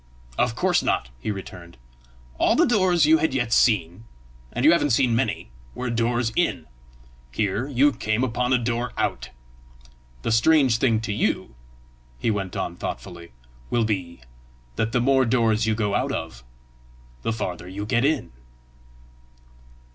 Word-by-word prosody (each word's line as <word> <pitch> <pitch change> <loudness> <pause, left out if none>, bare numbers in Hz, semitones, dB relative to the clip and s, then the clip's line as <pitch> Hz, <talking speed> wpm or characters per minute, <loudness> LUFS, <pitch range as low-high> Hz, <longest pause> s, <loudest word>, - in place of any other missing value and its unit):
"Of - - 0
course - - +2
not!" 60 - -1
he 65 - -5
returned; 90 -5 -8 0.6
"all - - +3
the - - +4
doors 185 -8 +3
you 160 +1 +5
had 155 -4 0
yet 120 -3 0
seen 105 -3 +2 0.5
and 120 +3 -1
you 155 - +8
haven't 170 -4 +2
seen 120 -1 +2
many 115 - -2 0.2
were 125 -1 -3
doors 120 0 0
in; - - 0 0.7
here 105 - -1
you 145 +1 +3
came 110 -2 -1
upon 125 0 -1
a 130 - +5
door 120 0 -2
out! - - -2 0.9
The - - -1
strange 130 +1 +4
thing 115 -4 +2
to 110 -2 -3
you," 105 - -1 0.6
he 110 - 0
went 95 -3 -3
on 85 0 -4
thoughtfully, 85 -2 -7 0.4
"will 115 -2 +1
be, 90 - -3 0.5
that 110 - -1
the 125 - +1
more 135 +1 +3
doors 115 -2 +1
you 110 - +1
go 105 -2 -1
out - - 0
of, - - -5 0.8
the 115 - -1
farther 90 -5 -4
you 100 +3 -6
get 120 +3 +1
in!" 150 - 0
115 Hz, 155 wpm, -24 LUFS, 105-130 Hz, 0.9 s, you